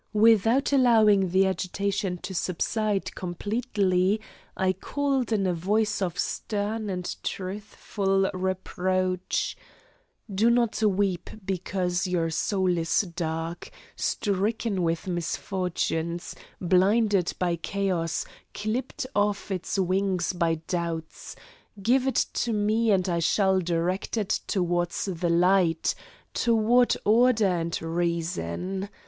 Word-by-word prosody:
Without 225 +5 +4
allowing 220 -7 +5
the 190 +2 +4
agitation 190 0 -1
to 185 +1 -5
subside 200 +3 -1
completely, 195 0 0 0.4
I 185 0 +2
called 270 +4 -1
in 205 -3 +1
a 180 - +1
voice 205 +6 0
of 180 -2 -2
stern 210 +3 -2
and 180 -2 -3
truthful 195 0 -2
reproach: 185 0 -1 0.8
"Do 215 +5 +3
not 235 -2 +2
weep 200 -3 +1 0.2
because 185 -1 -1
your 170 -3 0
soul 185 0 +1
is 165 0 +2
dark, 165 0 -3 0.3
stricken 205 0 -1
with 165 -1 -1
misfortunes, 175 -1 -2 0.3
blinded 195 +1 +3
by 175 -2 0
chaos, 175 -2 -1 0.3
clipped 225 +6 -3
of 205 0 0
its 185 +1 -2
wings 190 -1 +1
by 170 -2 +1
doubts; 170 -2 -4 0.4
give 250 +6 +2
it 265 - +2
to 235 - -1
me 215 +2 +1
and 190 -2 +3
I 170 -2 0
shall 190 +3 +3
direct 175 +4 -1
it 210 -3 0
toward 175 -2 0
the 175 -2 -2
light, 175 -1 +3 0.4
toward 235 +1 +3
order 225 0 +4
and 170 -3 0
reason. 170 - -2
190 Hz, 110 wpm, -26 LUFS, 175-210 Hz, 0.8 s, allowing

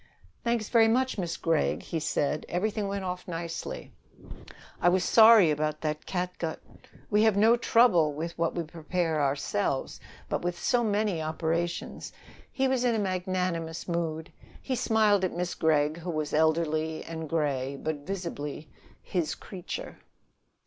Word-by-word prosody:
"Thanks 235 -2 0
very 225 -2 +5
much, 255 0 +1
Miss 170 -2 -2
Gregg," 165 -2 0
he 165 - -3
said. 150 -1 -1
"Everything 205 +3 -1
went 195 -1 -3
off 180 0 -5
nicely." 170 -1 -5 0.9
"I 175 - +5
was 180 0 +2
sorry 220 -7 +7
about 155 0 -1
that 150 -1 -3
catgut. 180 -3 -3 0.5
We 210 +1 +4
have 220 -2 +4
no 225 +3 +6
trouble 225 -10 +4
with 160 +3 -5
what 165 -1 -1
we 170 - -1
prepare 165 0 -2
ourselves. 135 -2 -1 0.3
But - - -2
with 175 0 -2
so 240 +6 +1
many 205 -5 0
operations 165 +2 -3 0.2
" - - -24
He 265 0 +1
was 260 -1 +1
in 240 -2 +2
a - - +1
magnanimous 180 -4 -2
mood. 165 -2 -2 0.3
He 260 - -3
smiled 215 -4 +3
at 185 - -1
Miss 175 0 -2
Gregg, 155 -1 +2
who 175 +1 -6
was 155 -3 -2
elderly 160 0 +1
and 160 -2 -6
gray, 140 -4 -1
but 155 -1 -2
visibly 155 -3 -6 0.3
his 170 -4 -2
creature. 185 -3 -7
170 Hz, 150 wpm, -28 LUFS, 155-200 Hz, 0.9 s, sorry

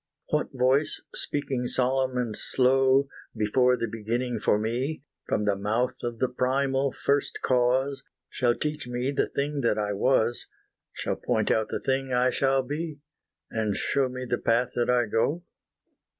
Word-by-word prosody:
What 150 - 0
voice 130 +3 +1
speaking 135 -4 -2
solemn 130 0 +1
and 120 -4 -1
slow, 135 +1 +3 0.3
Before 125 +4 +3
the 115 - -1
beginning 115 +2 -2
for 105 - +2
me, 125 +7 -2 0.2
From 105 - 0
the 100 -1 +2
mouth 110 +6 0
of 120 -1 -3
the 130 - +1
primal 135 +2 0
First 140 +2 0
Cause, 130 +2 +2 0.3
Shall 120 -2 +1
teach 150 -4 -3
me 125 +2 -1
the 140 - 0
thing 145 +1 -2
that 115 -3 +1
I 105 -1 -1
was, 120 +2 +1 0.4
Shall - - -3
point - - 0
out 110 -1 +1
the - - -2
thing 135 0 -1
I 125 +1 +3
shall 135 0 +2
be, 150 +3 -4 0.5
And 110 -3 -1
show 135 -2 +1
me 130 0 -5
the 120 - -1
path 120 +2 +1
that 120 0 0
I 125 -1 +3
go? 140 +10 0
125 Hz, 160 wpm, -27 LUFS, 120-135 Hz, 0.5 s, slow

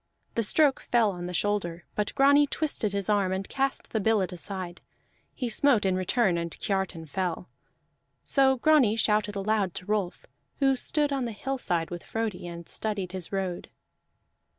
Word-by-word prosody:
The 230 - +1
stroke 280 +5 +3
fell 230 -4 +4
on 175 -1 -6
the - - -5
shoulder, 175 -3 -1
but 210 0 -2
Grani 285 +1 +5
twisted 280 -9 -1
his 200 -1 -2
arm 200 -3 +2
and 190 +1 -2
cast 270 0 -2
the 220 - 0
billet 210 -3 +1
aside; 180 +1 -5 0.5
he 250 - -2
smote 235 -2 +4
in 190 -1 +2
return, 185 -1 +1
and 170 0 -3
Kiartan 190 -4 -2
fell. 180 +2 -3 0.7
So 265 -1 +4
Grani 265 -5 +4
shouted 210 -2 +1
aloud 200 -2 0
to 185 - -6
Rolf, 205 -3 -2 0.3
who 270 -1 +3
stood 290 +2 0
on 270 -2 -1
the 235 - -3
hillside 210 -8 -2
with 175 -1 -6
Frodi 220 -6 -3
and 170 -1 -8
studied 205 -4 -3
his 185 -2 -6
road. 190 -3 -3
205 Hz, 165 wpm, -27 LUFS, 185-245 Hz, 0.7 s, Grani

